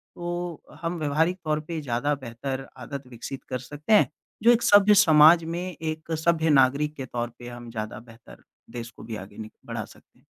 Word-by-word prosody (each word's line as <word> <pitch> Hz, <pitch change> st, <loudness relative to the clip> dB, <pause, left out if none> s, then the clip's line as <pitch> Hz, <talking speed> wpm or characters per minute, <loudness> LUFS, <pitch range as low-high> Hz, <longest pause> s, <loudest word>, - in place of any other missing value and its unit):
तो 175 Hz, -1 st, -4 dB, 0.2 s
हम 170 Hz, +1 st, -2 dB
व्यावहारिक 160 Hz, +4 st, +1 dB
तौर 155 Hz, -1 st, +1 dB
पे 165 Hz, -2 st, -3 dB
ज़्यादा 140 Hz, +2 st, 0 dB
बेहतर 130 Hz, +1 st, -6 dB
आदत 135 Hz, +2 st, -7 dB
विकसित 125 Hz, +2 st, -8 dB
कर 125 Hz, -, -2 dB
सकते 150 Hz, +8 st, -1 dB
हैं। 210 Hz, -, +6 dB, 0.3 s
जो 235 Hz, -, +8 dB
एक 240 Hz, -1 st, +3 dB
सभ्य 205 Hz, 0 st, +6 dB
समाज 160 Hz, +1 st, +7 dB
में, 170 Hz, +3 st, -4 dB
एक 155 Hz, 0 st, -4 dB
सभ्य 165 Hz, -1 st, +3 dB
नागरिक 145 Hz, +2 st, +3 dB
के 135 Hz, -, -5 dB
तौर 120 Hz, -1 st, -3 dB
पे 120 Hz, -, -9 dB
हम 120 Hz, -1 st, -9 dB
ज़्यादा 110 Hz, -1 st, -5 dB
बेहतर 115 Hz, 0 st, -16 dB, 0.3 s
देश 120 Hz, -1 st, -7 dB
को -, -, -14 dB
भी 115 Hz, -1 st, -6 dB
आगे 100 Hz, 0 st, -10 dB
नि 110 Hz, -1 st, -7 dB, 0.2 s
बढ़ा -, -, -4 dB
सकते -, -, -21 dB
हैं। -, -, -31 dB
145 Hz, 195 wpm, -26 LUFS, 120-165 Hz, 0.3 s, जो